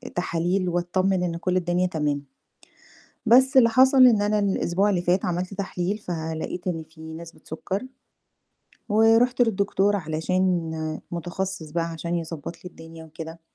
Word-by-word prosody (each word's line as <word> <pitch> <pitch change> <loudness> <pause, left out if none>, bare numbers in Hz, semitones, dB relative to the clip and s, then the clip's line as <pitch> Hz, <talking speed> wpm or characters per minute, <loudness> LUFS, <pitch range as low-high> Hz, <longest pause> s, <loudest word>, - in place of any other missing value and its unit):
تحاليل 175 +1 0
واتطمن 180 +2 0
إن 170 -1 -2
كل 180 +1 0
الدنيا 180 +1 +1
تمام. 150 -4 -2 1.0
بس 260 +4 +5
اللي 235 -3 +7
حصل 260 +2 +6
إن 220 -4 +4
أنا 210 +1 +1
الأسبوع 195 0 +1
اللي 180 -3 +1
فات 180 +2 +1
عملت 180 +2 -2
تحليل 190 0 -3
فلقيت 165 -1 -5
إن 165 -3 -2
في 160 0 -16
نسبة 170 +1 -11
سُكَّر. 190 +6 -4 1.1
ورُحت 225 +4 +4
للدكتور 205 -2 +1
علشان 160 -1 -1
متخصص 175 -1 -4
بقى 165 +1 -1
عشان 170 +1 -4
يضبط 165 -1 -6
لي 180 - -11
الدنيا 165 0 -12
وكده، 160 +1 -9
180 Hz, 135 wpm, -24 LUFS, 165-200 Hz, 1.1 s, اللي